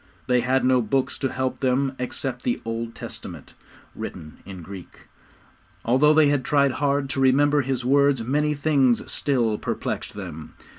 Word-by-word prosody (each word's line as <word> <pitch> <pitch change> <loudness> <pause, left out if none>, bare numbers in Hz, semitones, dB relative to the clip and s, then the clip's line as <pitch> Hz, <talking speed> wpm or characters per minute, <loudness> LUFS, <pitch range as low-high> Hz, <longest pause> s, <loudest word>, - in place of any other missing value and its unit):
They 125 -1 +2
had 130 +1 +1
no 130 -1 +4
books 130 +4 -1
to 135 - -1
help 130 0 -2
them 135 +1 +1
except 125 0 -3
the 120 - -1
Old 115 0 -4
Testament, - - -9 0.4
written 75 0 -8
in 95 -3 -9
Greek. 95 +1 -11 0.8
Although 140 +6 +4
they 155 -2 +5
had 145 -2 +1
tried 140 -1 +2
hard 140 0 0
to - - -2
remember 145 +2 +4
his 130 -2 -3
words, 140 -2 +3
many 150 +5 0
things 140 -5 +1
still 120 -7 0
perplexed - - -4
them. 75 0 -8
130 Hz, 155 wpm, -24 LUFS, 120-140 Hz, 0.8 s, they